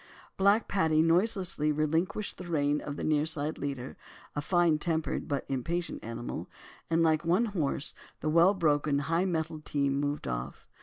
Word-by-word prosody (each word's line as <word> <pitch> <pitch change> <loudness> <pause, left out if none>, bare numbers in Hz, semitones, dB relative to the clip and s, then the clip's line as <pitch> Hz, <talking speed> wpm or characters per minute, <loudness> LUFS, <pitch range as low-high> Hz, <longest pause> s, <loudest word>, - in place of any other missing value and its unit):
Black 200 +3 +3
Paddy 160 -5 +3
noiselessly 175 -3 +2
relinquished 160 +7 -1
the 180 - -7
rein 145 -3 +1
of 145 - -5
the - - -5
nearside 155 0 0
leader, 135 -2 -4 0.4
a 145 - -1
fine 170 -1 +2
tempered, 160 -1 -1
but 140 -3 -2
impatient 165 +6 -3
animal, 115 +1 -5 0.4
and 165 0 +3
like 155 -1 +3
one 180 +8 +3
horse, 160 -10 -2 0.3
the - - -4
well 170 +5 +5
broken, 150 -4 +2
high 165 +5 +1
mettled 160 -3 -2
team 140 -2 0
moved 145 +1 -2
off. 60 0 -5
155 Hz, 155 wpm, -30 LUFS, 145-175 Hz, 0.4 s, well